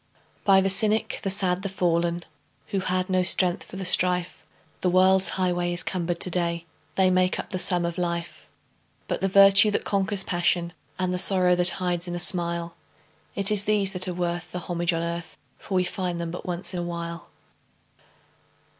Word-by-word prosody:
By 195 -1 +5
the 195 - 0
cynic, 215 +3 +1
the 195 - -3
sad, 190 -2 +1
the 200 - -4
fallen, 175 -2 -1 0.4
Who 195 - -2
had 185 0 -2
no 185 -1 +1
strength 180 0 +3
for - - -12
the 190 -1 -5
strife, 180 0 +1 0.4
The 180 - 0
world's 185 +1 +4
highway 175 -1 -1
is 175 - -2
cumbered 175 -2 -3
to 180 - +2
day, 170 -1 -2 0.3
They 190 -1 +2
make 185 0 +1
up - - -7
the 185 - -3
sum 175 -2 +2
of 170 +1 -4
life. 170 -1 -5 0.6
But - - -3
the 195 - +1
virtue 195 +2 +6
that 205 - -2
conquers 195 0 0
passion, 175 -1 0 0.2
And 185 -1 -2
the 180 - -1
sorrow 185 -1 +4
that 180 0 +5
hides 180 -1 -2
in 175 - -5
a - - -4
smile, 170 -1 0 0.6
It 200 +1 -1
is 205 -1 +4
these 205 -2 +1
that 185 0 +2
are 180 - -3
worth 175 0 -4
the - - -5
homage 175 0 -2
on 165 0 -2
earth 170 0 -6 0.2
For 195 - -6
we 185 - +2
find 180 -1 -4
them 170 -1 -4
but 175 - -8
once 180 +2 -3
in 180 - -3
a - - -3
while. 170 -1 -7
180 Hz, 195 wpm, -24 LUFS, 175-190 Hz, 0.6 s, virtue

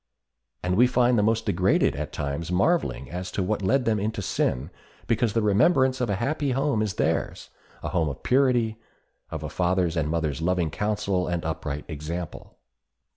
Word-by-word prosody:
And 90 0 +1
we 125 +2 +6
find 125 0 +3
the 105 - +3
most 110 +1 +1
degraded 95 +2 +2
at - - -4
times 75 +4 -3
marveling 95 - +1
as 90 +1 -4
to 95 - 0
what 105 +3 -1
led 125 +7 +2
them 110 -2 +2
into 105 0 -2
sin, 70 -2 -1 0.3
because 115 -1 +1
the 115 - +1
remembrance 130 - +3
of 120 - 0
a 100 - +1
happy 135 +5 -1
home 135 -4 +1
is 105 -4 -1
theirs—a - - -3
home 80 -4 +1
of 70 - -8
purity, 125 -4 +2 0.5
of - - -5
a - - -3
father's 90 -1 +1
and 75 -3 0
mother's 80 -3 -1
loving 85 -2 +1
counsel 105 -2 -1
and 85 -2 -2
upright 75 -2 -3
example. 80 +2 -6
100 Hz, 175 wpm, -25 LUFS, 85-115 Hz, 0.5 s, we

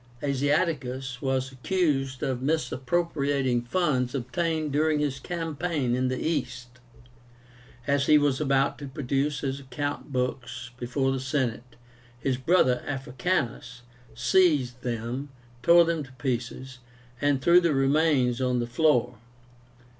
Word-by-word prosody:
Asiaticus 135 -3 -1
was 130 -1 -1
accused 135 -2 -1
of 130 -2 -1
misappropriating 140 -3 0
funds 125 -2 0
obtained 155 +4 -1
during 155 +2 +2
his 145 -2 -1
campaign 160 -4 -2
in 130 +1 +1
the 130 0 -1
East. 125 -6 -3 1.1
As 140 +1 +1
he 150 - +7
was 145 -1 +1
about 135 -1 +1
to 145 - -6
produce 140 +1 -1
his 135 -1 -2
account 145 +2 -5
books 125 -1 -3
before 135 +2 0
the 135 - -1
Senate, 130 -2 -2 0.4
his 130 0 0
brother, 130 -3 +3
Africanus, 125 -2 -2 0.3
seized 125 -1 +2
them, 120 +3 -4 0.3
tore 170 +5 +6
them 165 -1 -1
to 135 -2 -9
pieces, 125 0 -4 0.4
and 145 -2 +2
threw 170 +6 +5
the 170 -2 +2
remnants 135 -3 +2
on 125 -1 +1
the 120 - 0
floor. 120 -2 +1
135 Hz, 125 wpm, -27 LUFS, 125-150 Hz, 1.1 s, he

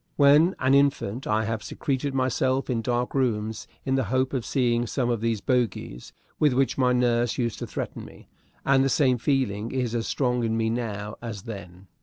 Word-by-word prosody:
When 150 +5 +5
an 130 +1 +2
infant 140 -4 +1
I 110 +1 +1
have 115 0 -2
secreted 135 +4 -3
myself 130 +1 0
in 115 -2 0
dark 120 +1 -1
rooms 110 -4 -1 0.2
in 135 - 0
the 135 -2 +1
hope 130 +5 0
of 130 -3 -1
seeing 120 -2 +1
some 125 -1 0
of 115 -2 -1
those 115 -3 0
bogies 120 - -2 0.3
with 150 -4 +4
which 135 +1 +1
my 125 -2 +2
nurse 120 -1 +1
used 120 -3 -2
to - - -5
threaten - - -5
me; - - -14 0.4
and 135 -1 +4
the 135 - +2
same 130 -3 +2
feeling 115 -5 0
is 125 -3 -1
as 115 -1 -1
strong 125 -3 0
in 115 0 0
me 110 0 +1
now 105 -3 -4
as 110 -5 -6
then. 95 -4 -9
120 Hz, 195 wpm, -25 LUFS, 115-130 Hz, 0.4 s, When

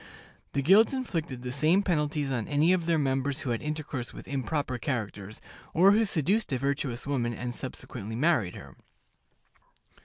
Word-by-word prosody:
The 140 - 0
guilds 200 - +6
inflicted 165 - -3
the 125 - -4
same 155 +9 +3
penalties 150 -5 0
on 120 -5 -2
any 150 +5 +3
of 175 -3 0
their 165 -1 +3
members 135 -1 0
who 130 - -2
had 115 - -1
intercourse 150 -5 -4
with - - -11
improper 140 -1 -2
characters, 110 -6 -4 0.3
or 185 +5 +7
who 220 +2 +4
seduced 195 +3 +1
a 130 - +1
virtuous 135 -2 -2
woman 120 -4 -1
and 120 +1 -4
subsequently 115 -3 -7
married 125 - +2
her. 70 -1 -11
140 Hz, 160 wpm, -28 LUFS, 125-165 Hz, 0.3 s, or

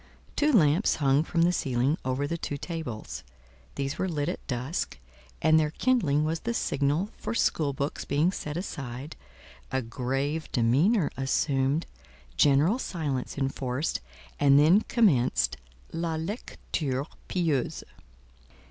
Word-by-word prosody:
Two 300 +1 +3
lamps 170 - +4
hung 140 -1 +3
from 165 0 +1
the 175 - +4
ceiling 135 -2 +1
over 130 +2 -1
the 165 - -2
two 145 -3 -4
tables; 120 - -5 0.5
these 140 0 -3
were 190 - 0
lit 150 -1 -1
at 180 - -6
dusk, 130 - -3 0.5
and 160 0 +6
their 155 -1 +1
kindling 160 - +2
was 160 +1 -1
the 235 +5 -3
signal 150 +8 0
for - - -3
school 155 -9 +2
books 140 +2 -3
being 150 +6 +2
set 150 -4 -5
aside, 140 -5 -6 0.6
a 130 0 0
grave 135 +6 -2
demeanour 145 - +3
assumed, 135 +2 +1 0.5
general 145 - +4
silence 145 - -3
enforced, 135 - -1 0.4
and 140 -1 +6
then 160 +8 +6
commenced 120 - +2 0.4
"la 165 -1 -1
lecture 155 - -3 0.2
pieuse." 160 -8 0
145 Hz, 130 wpm, -28 LUFS, 135-170 Hz, 0.6 s, and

